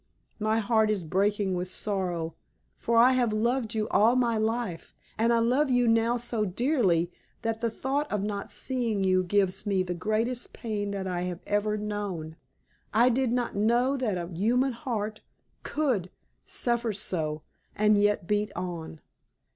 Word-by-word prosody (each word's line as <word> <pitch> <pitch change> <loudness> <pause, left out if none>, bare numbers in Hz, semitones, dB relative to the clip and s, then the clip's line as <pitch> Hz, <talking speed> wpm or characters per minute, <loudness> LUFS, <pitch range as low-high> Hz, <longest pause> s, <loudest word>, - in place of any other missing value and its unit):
My 215 +1 +1
heart 220 0 +2
is 205 -4 0
breaking 195 +3 +1
with 180 0 -2
its 185 - -5
sorrow; 180 -5 -2 0.5
for 235 0 +1
I 245 +3 +7
have 250 -3 +2
loved 230 +1 0
you 215 -1 0
all 225 +4 +4
my 240 -2 +2
life, 220 -6 -2 0.2
and 230 +2 +2
I 235 - +4
love 255 +6 +2
you 245 -1 +3
now 230 +1 +3
so 235 -2 -1
dearly 190 - +1 0.3
that 225 0 -2
the 230 - +1
thought 270 +6 -2
of 210 -2 0
not 205 -1 -4
seeing 235 -6 -1
you 185 -1 +3
gives 195 +2 0
me 195 -2 +2
the 180 -1 -3
greatest 215 +7 -2
pain 210 -3 -3
that 200 -1 -3
I 180 -2 -2
have 175 0 -6
ever 210 +1 0
known. 205 -7 -4 0.6
I 235 +4 +5
did 250 0 +1
not 245 -3 -1
know 240 +6 +2
that 235 -8 -1
a 170 -1 -4
human 245 +9 +2
heart 215 -3 -4 0.4
could 250 - -1 0.4
suffer 235 -2 -1
so 160 -7 -3 0.3
and 210 0 +4
yet 205 -3 +2
beat 210 +2 0
on. 170 -3 -5
215 Hz, 165 wpm, -28 LUFS, 190-235 Hz, 0.6 s, I